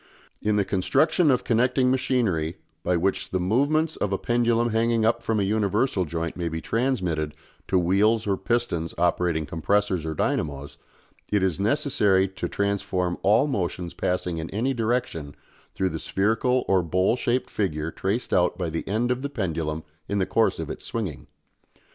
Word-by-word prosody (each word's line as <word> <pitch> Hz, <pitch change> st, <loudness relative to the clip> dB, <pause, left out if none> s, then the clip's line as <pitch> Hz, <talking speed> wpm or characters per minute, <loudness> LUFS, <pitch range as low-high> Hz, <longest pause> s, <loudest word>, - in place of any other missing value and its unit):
In 105 Hz, 0 st, +1 dB
the 100 Hz, -1 st, +2 dB
construction 150 Hz, -, +2 dB
of 130 Hz, -, +2 dB
connecting 125 Hz, +2 st, +2 dB
machinery 115 Hz, -11 st, 0 dB, 0.3 s
by 90 Hz, 0 st, +1 dB
which 95 Hz, +3 st, -1 dB
the 95 Hz, -, -1 dB
movements 145 Hz, -, +1 dB
of 105 Hz, -, -1 dB
a 95 Hz, -, +1 dB
pendulum 120 Hz, 0 st, +1 dB
hanging 115 Hz, 0 st, +2 dB
up 115 Hz, -, +2 dB
from 110 Hz, -1 st, 0 dB
a -, -, +2 dB
universal 105 Hz, 0 st, +1 dB
joint 85 Hz, +1 st, -3 dB
may 85 Hz, -1 st, -2 dB
be 80 Hz, 0 st, -3 dB
transmitted 90 Hz, -, -1 dB, 0.3 s
to 95 Hz, -, +2 dB
wheels 100 Hz, +6 st, +3 dB
or 100 Hz, -2 st, +1 dB
pistons 95 Hz, -5 st, -1 dB
operating 85 Hz, -2 st, +1 dB
compressors 95 Hz, +3 st, 0 dB
or 80 Hz, -1 st, -3 dB
dynamos, 70 Hz, -1 st, -2 dB, 0.5 s
it 105 Hz, -2 st, +2 dB
is 95 Hz, -3 st, 0 dB
necessary 105 Hz, -5 st, +2 dB
to 95 Hz, -, -5 dB
transform 95 Hz, -3 st, -1 dB
all 110 Hz, +7 st, +4 dB
motions 90 Hz, -, -2 dB
passing 90 Hz, -2 st, -1 dB
in 80 Hz, -, -5 dB
any 120 Hz, +7 st, 0 dB
direction 115 Hz, -, -2 dB, 0.4 s
through 95 Hz, -, +1 dB
the 80 Hz, -, -4 dB
spherical 115 Hz, +8 st, +1 dB
or 95 Hz, -1 st, +4 dB
bowl 90 Hz, +6 st, +1 dB
shaped 125 Hz, 0 st, -1 dB
figure 80 Hz, -6 st, -1 dB
traced 100 Hz, +9 st, -2 dB
out 90 Hz, -1 st, +2 dB
by 90 Hz, -4 st, -2 dB
the 80 Hz, -, -4 dB
end 115 Hz, +5 st, 0 dB
of 125 Hz, +1 st, -1 dB
the 140 Hz, -, -3 dB
pendulum 80 Hz, -, -2 dB, 0.3 s
in 100 Hz, -, 0 dB
the 95 Hz, -, +2 dB
course 115 Hz, +3 st, +2 dB
of -, -, -4 dB
its -, -, -8 dB
swinging. 90 Hz, -, -4 dB
100 Hz, 170 wpm, -25 LUFS, 85-120 Hz, 0.5 s, all